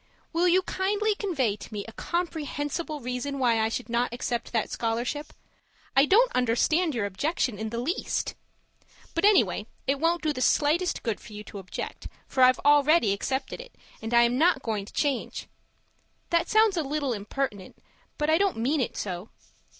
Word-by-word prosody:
Will 340 Hz, +2 st, +3 dB
you 365 Hz, +2 st, +4 dB
kindly 415 Hz, +4 st, 0 dB
convey 295 Hz, -, -1 dB
to -, -, -11 dB
me 205 Hz, -2 st, -5 dB
a -, -, -8 dB
comprehensible 310 Hz, -2 st, -3 dB
reason 250 Hz, +3 st, -3 dB
why 240 Hz, -4 st, +2 dB
I 220 Hz, -, +1 dB
should 240 Hz, +2 st, -4 dB
not 235 Hz, +1 st, 0 dB
accept 240 Hz, -1 st, -3 dB
that 225 Hz, -2 st, -1 dB
scholarship? 240 Hz, +6 st, -2 dB, 0.6 s
I 270 Hz, +2 st, +6 dB
don't 470 Hz, +8 st, +5 dB
understand 260 Hz, +7 st, +2 dB
your 225 Hz, -4 st, 0 dB
objection 240 Hz, -, -1 dB
in 220 Hz, 0 st, -3 dB
the 230 Hz, -, -5 dB
least. 290 Hz, -, -2 dB, 0.8 s
But 335 Hz, -, +1 dB
anyway, 225 Hz, -, +3 dB, 0.2 s
it 275 Hz, +1 st, 0 dB
won't 335 Hz, +2 st, +1 dB
do 305 Hz, -1 st, +1 dB
the 255 Hz, -, -5 dB
slightest 315 Hz, +7 st, +2 dB
good 225 Hz, -4 st, -2 dB
for 215 Hz, -, -13 dB
you 210 Hz, 0 st, -7 dB
to 205 Hz, -, -9 dB
object, 185 Hz, -1 st, -6 dB, 0.2 s
for 260 Hz, -, -1 dB
I've 255 Hz, 0 st, +7 dB
already 290 Hz, -5 st, +5 dB
accepted 265 Hz, -, -3 dB
it -, -, -14 dB, 0.3 s
and 225 Hz, +1 st, -5 dB
I 235 Hz, 0 st, +6 dB
am 240 Hz, +2 st, +1 dB
not 325 Hz, -4 st, +3 dB
going 215 Hz, -3 st, -2 dB
to -, -, -14 dB
change! 280 Hz, -4 st, -2 dB, 0.8 s
That 335 Hz, 0 st, +2 dB
sounds 435 Hz, -3 st, +4 dB
a -, -, +2 dB
little 285 Hz, -2 st, -1 dB
impertinent, 205 Hz, -1 st, -4 dB, 0.4 s
but 300 Hz, -, 0 dB
I 315 Hz, +2 st, +4 dB
don't 395 Hz, -, +1 dB
mean 265 Hz, +6 st, +1 dB
it 245 Hz, -, -3 dB
so. 185 Hz, +1 st, -4 dB
270 Hz, 180 wpm, -27 LUFS, 230-330 Hz, 0.8 s, I've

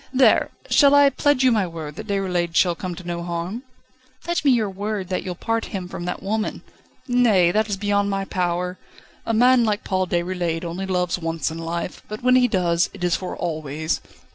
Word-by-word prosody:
There! 260 Hz, 0 st, +4 dB, 0.2 s
shall 285 Hz, -1 st, +5 dB
I 285 Hz, -1 st, +6 dB
pledge 285 Hz, 0 st, +2 dB
you 255 Hz, -, +5 dB
my 210 Hz, -5 st, +2 dB
word 160 Hz, -3 st, -7 dB
that -, -, -8 dB
Déroulède 180 Hz, -4 st, -1 dB
shall 175 Hz, -2 st, +4 dB
come 180 Hz, +1 st, -5 dB
to 185 Hz, -, -10 dB
no 170 Hz, 0 st, -3 dB
harm?" 170 Hz, +6 st, -4 dB, 0.6 s
"Pledge 345 Hz, +1 st, -1 dB
me 285 Hz, -, +4 dB
your 235 Hz, -5 st, +3 dB
word 200 Hz, -1 st, -4 dB
that 185 Hz, -, -1 dB
you'll 180 Hz, -1 st, -5 dB
part 225 Hz, +4 st, -1 dB
him 185 Hz, -3 st, -5 dB
from 175 Hz, -1 st, -6 dB
that 180 Hz, -, -4 dB
woman." 215 Hz, +2 st, -2 dB, 0.4 s
"Nay; 225 Hz, -9 st, +4 dB
that 215 Hz, +3 st, +1 dB
is 200 Hz, -, -1 dB
beyond 200 Hz, 0 st, +1 dB
my 195 Hz, 0 st, -1 dB
power. 180 Hz, -1 st, -2 dB, 0.5 s
A 225 Hz, -, +1 dB
man 250 Hz, +2 st, +5 dB
like 210 Hz, -2 st, 0 dB
Paul 185 Hz, -1 st, 0 dB
Déroulède 175 Hz, -1 st, -1 dB
only 180 Hz, +3 st, -4 dB
loves 180 Hz, -1 st, 0 dB
once 165 Hz, -1 st, -2 dB
in 160 Hz, -, -6 dB
life, 170 Hz, +2 st, -4 dB
but 215 Hz, +2 st, -7 dB
when 255 Hz, 0 st, +5 dB
he 250 Hz, -1 st, +5 dB
does, 175 Hz, -5 st, +1 dB
it 190 Hz, -, -8 dB
is 175 Hz, 0 st, +2 dB
for 185 Hz, -, -5 dB
always." 155 Hz, -2 st, -3 dB
185 Hz, 205 wpm, -22 LUFS, 175-220 Hz, 0.6 s, I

